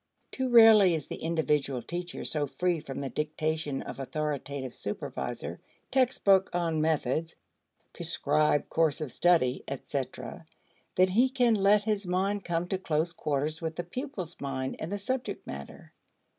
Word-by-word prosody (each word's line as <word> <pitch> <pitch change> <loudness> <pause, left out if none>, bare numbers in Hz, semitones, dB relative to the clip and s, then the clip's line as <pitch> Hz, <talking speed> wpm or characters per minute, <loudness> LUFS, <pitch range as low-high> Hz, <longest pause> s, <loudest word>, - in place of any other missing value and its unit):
Too 260 -1 -2
rarely 220 -6 +8
is 150 -4 -4
the - - -6
individual 150 -5 0
teacher 175 0 -5
so 150 -2 0
free 175 +3 0
from 140 -2 -6
the 135 - -3
dictation 155 -1 -2
of - - -8
authoritative 140 -2 -3
supervisor, 65 - -5 0.3
textbook 205 -7 +4
on 165 -3 0
methods, 160 +1 0 0.6
prescribed 150 -1 +1
course 160 -3 +2
of 150 -5 -4
study, 160 -7 +3
etc., 135 0 -5 0.5
that 185 0 +4
he 245 +7 +4
can 250 -3 +3
let 205 0 +4
his 210 -3 -1
mind 195 +3 0
come 170 0 -1
to 190 - -1
close 165 -1 0
quarters 150 0 -2
with 160 -1 -3
the 175 - -3
pupil's 185 - -6
mind 130 -1 -3
and 160 - -5
the 205 - -1
subject 255 +5 -3
matter. - - -9
165 Hz, 145 wpm, -29 LUFS, 150-195 Hz, 0.6 s, rarely